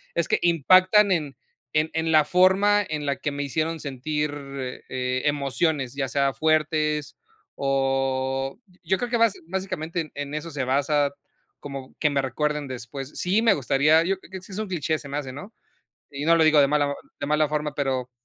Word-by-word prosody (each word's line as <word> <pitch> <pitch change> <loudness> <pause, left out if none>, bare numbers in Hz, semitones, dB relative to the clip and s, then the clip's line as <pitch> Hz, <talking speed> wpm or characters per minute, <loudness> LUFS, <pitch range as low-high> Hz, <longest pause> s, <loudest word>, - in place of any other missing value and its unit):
Es - - +1
que - - +2
impactan 185 +5 +5
en 150 -7 -1 0.4
en 155 +1 +2
en 160 0 0
la 155 -1 +6
forma, 190 +4 +4
en 150 -1 -3
la 140 -1 -1
que 145 - -3
me 145 0 -3
hicieron 160 +3 -2
sentir, 150 +2 -2 0.6
eh, 130 0 -2
emociones. 140 -1 0
Ya 135 -1 -1
sea 140 -1 +1
fuertes, 155 -1 0 0.4
o 135 -1 0 0.3
yo 190 +3 +1
creo 245 - -3
que, 235 - +2
bas 230 -3 +4
básicamente, 170 -4 -4
en 145 0 -5
eso 155 +2 -4
se 140 -2 -3
basa, 145 +2 +1 0.5
como 135 -2 -8
que 150 - +3
me 140 -1 +1
recuerden 150 +2 -1
después. 130 +2 -7
Sí, 195 +5 +2
me 225 - +5
gustaría 150 +3 +3
Yo 190 +2 0
creo, - - -18
que 190 -1 -7
sí 195 - -11
es 185 - -5
un 215 - -3
cliché, 160 -3 -1
se 140 - -10
me 145 - -3
hace, 135 -3 -4
¿no? 190 - -10 0.6
Y 140 +1 -5
no 165 - +6
lo 160 - +4
digo 155 -1 +5
de 140 - +4
mala 145 -1 +2
o 140 - -4 0.2
de 145 - -2
mala 150 0 +2
forma, 150 -1 -2
pero, 130 -3 -2
150 Hz, 195 wpm, -24 LUFS, 135-165 Hz, 0.6 s, la